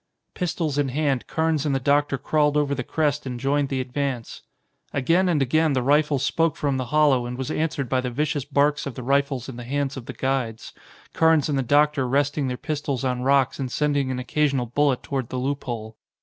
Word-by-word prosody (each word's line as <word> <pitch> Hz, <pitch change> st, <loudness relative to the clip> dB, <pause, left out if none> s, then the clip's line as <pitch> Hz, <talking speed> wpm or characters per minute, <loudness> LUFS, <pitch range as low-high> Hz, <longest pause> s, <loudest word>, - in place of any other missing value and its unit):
Pistols 160 Hz, -5 st, -2 dB
in 140 Hz, -2 st, +1 dB
hand, 140 Hz, -2 st, -1 dB
Carnes 160 Hz, -2 st, 0 dB
and 145 Hz, -3 st, 0 dB
the -, -, +1 dB
doctor 140 Hz, +1 st, +2 dB
crawled 150 Hz, +2 st, +1 dB
over 145 Hz, -1 st, +1 dB
the 125 Hz, -2 st, -3 dB
crest 150 Hz, 0 st, -1 dB
and 125 Hz, -2 st, -4 dB
joined 140 Hz, +2 st, +1 dB
the 135 Hz, -, -1 dB
advance. 130 Hz, -2 st, -3 dB, 0.5 s
Again 170 Hz, +7 st, +2 dB
and 150 Hz, -5 st, +2 dB
again 155 Hz, +3 st, +2 dB
the 130 Hz, -2 st, 0 dB
rifle 145 Hz, +2 st, +3 dB
spoke 160 Hz, +4 st, +1 dB
from 140 Hz, -2 st, -1 dB
the 130 Hz, -, -2 dB
hollow 145 Hz, -4 st, +3 dB
and 125 Hz, 0 st, -5 dB
was 130 Hz, +3 st, -3 dB
answered 155 Hz, -4 st, -1 dB
by 130 Hz, +1 st, +1 dB
the 125 Hz, -, -3 dB
vicious 145 Hz, +3 st, -1 dB
barks 145 Hz, +1 st, +1 dB
of 140 Hz, -, -6 dB
the 125 Hz, -, -6 dB
rifles 135 Hz, -1 st, 0 dB
in 130 Hz, -3 st, -8 dB
the 120 Hz, -, -7 dB
hands 140 Hz, +2 st, -2 dB
of 125 Hz, -, -8 dB
the -, -, -5 dB
guides, 130 Hz, -4 st, -2 dB, 0.4 s
Carnes 160 Hz, -2 st, +3 dB
and 140 Hz, -2 st, +1 dB
the -, -, +2 dB
doctor 145 Hz, +1 st, +2 dB
resting 140 Hz, +2 st, +1 dB
their 125 Hz, -1 st, -3 dB
pistols 140 Hz, -3 st, -3 dB
on 125 Hz, -1 st, -1 dB
rocks 135 Hz, 0 st, +2 dB
and 130 Hz, -2 st, -3 dB
sending 145 Hz, -2 st, 0 dB
an 130 Hz, -, -2 dB
occasional 135 Hz, 0 st, 0 dB
bullet 135 Hz, +2 st, +1 dB
toward 130 Hz, -4 st, -3 dB
the 130 Hz, -, -4 dB
loophole. 125 Hz, -5 st, -4 dB
140 Hz, 210 wpm, -24 LUFS, 130-150 Hz, 0.5 s, rifle